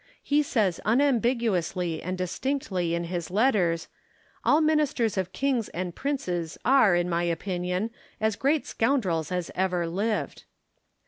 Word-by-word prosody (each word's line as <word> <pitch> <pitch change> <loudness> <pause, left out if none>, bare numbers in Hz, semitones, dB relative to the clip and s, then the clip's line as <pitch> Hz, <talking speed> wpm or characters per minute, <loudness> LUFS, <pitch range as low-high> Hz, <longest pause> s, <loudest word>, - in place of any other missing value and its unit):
He 290 +1 +3
says 215 - 0
unambiguously 225 - +1
and 185 +2 -3
distinctly 185 -3 -1
in 170 - -2
his 170 0 -4
letters, 185 -6 +2 0.3
" - - -34
All 295 - +4
ministers 300 -8 +2
of 185 -2 -2
kings 260 -4 0
and 180 0 -4
princes 180 - -3
are, 250 -8 +5
in 175 0 +1
my 170 -1 0
opinion, 180 +4 -2 0.3
as 220 -1 +1
great 285 +6 +1
scoundrels 200 - 0
as 180 -2 -2
ever 180 -2 0
lived." 205 +6 -2
190 Hz, 135 wpm, -27 LUFS, 175-255 Hz, 0.3 s, are